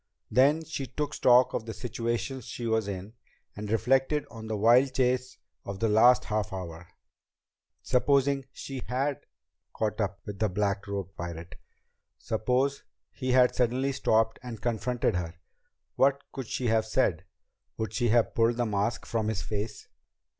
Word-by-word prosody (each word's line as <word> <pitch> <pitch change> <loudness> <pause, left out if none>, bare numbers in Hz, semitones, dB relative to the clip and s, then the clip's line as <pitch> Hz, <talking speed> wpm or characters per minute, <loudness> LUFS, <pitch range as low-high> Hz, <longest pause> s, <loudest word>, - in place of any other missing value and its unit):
Then 145 +5 +4
she 140 -4 -4
took 150 +2 -3
stock 125 0 +5
of 110 - -3
the 115 - -5
situation 120 +2 -3
she 120 +1 -6
was 110 -2 +1
in, 100 +2 -6 0.4
and 105 0 -6
reflected 135 +6 +2
on 110 -1 -8
the 110 -1 -2
wild 125 +5 +4
chase 125 0 0 0.3
of 100 0 -6
the 115 - +1
last 120 +4 +6
half 105 -2 -1
hour. 90 -3 -7 1.0
Supposing 135 +1 +2
she 135 -2 -7
had 135 +2 -2 0.5
caught 110 0 -1
up 100 -1 -2
with 100 -2 -7
the 110 - +2
black 100 +1 -1
robed 100 -2 -4
pirate? 85 0 -7 0.6
Suppose 125 +5 0 0.3
he 130 -2 -2
had 125 -1 +5
suddenly 125 +3 +1
stopped 110 -3 +1
and 120 -3 -7
confronted 120 -2 0
her? 85 -1 -4 0.6
What 135 +1 +4
could 130 -4 -6
she 125 - -3
have 110 0 +2
said? 90 -8 +1 0.5
Would 110 -1 -3
she 120 +1 +1
have 115 +1 +3
pulled 115 +1 +2
the 120 - +1
mask 105 +1 -1
from 110 -2 -1
his 105 -4 -2
face? 105 +4 -4
115 Hz, 155 wpm, -28 LUFS, 105-130 Hz, 1.0 s, last